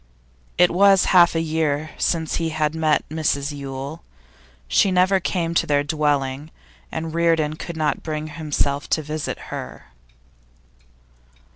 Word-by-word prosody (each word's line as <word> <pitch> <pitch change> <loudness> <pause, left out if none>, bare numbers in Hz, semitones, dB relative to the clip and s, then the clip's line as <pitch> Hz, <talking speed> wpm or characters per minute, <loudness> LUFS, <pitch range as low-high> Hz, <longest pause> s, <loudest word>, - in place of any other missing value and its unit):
It 180 - +5
was 195 +1 +5
half 175 -2 +6
a 165 - +1
year 155 -1 -1
since 160 -2 -1
he 165 -1 -1
had 155 -1 -1
met 160 -2 +1
Mrs 150 -2 -1
Yule. 140 +3 -7 0.6
She 200 - +3
never 185 +1 +3
came 170 -2 -2
to - - +1
their 145 -1 +2
dwelling, 145 -1 -1 0.4
and 160 0 -4
Reardon 165 -2 +1
could 170 0 -7
not 155 -1 0
bring 155 -1 -4
himself 150 -2 -2
to 155 - +1
visit 150 +1 -4 0.2
her. - - -8
155 Hz, 135 wpm, -22 LUFS, 145-165 Hz, 0.6 s, half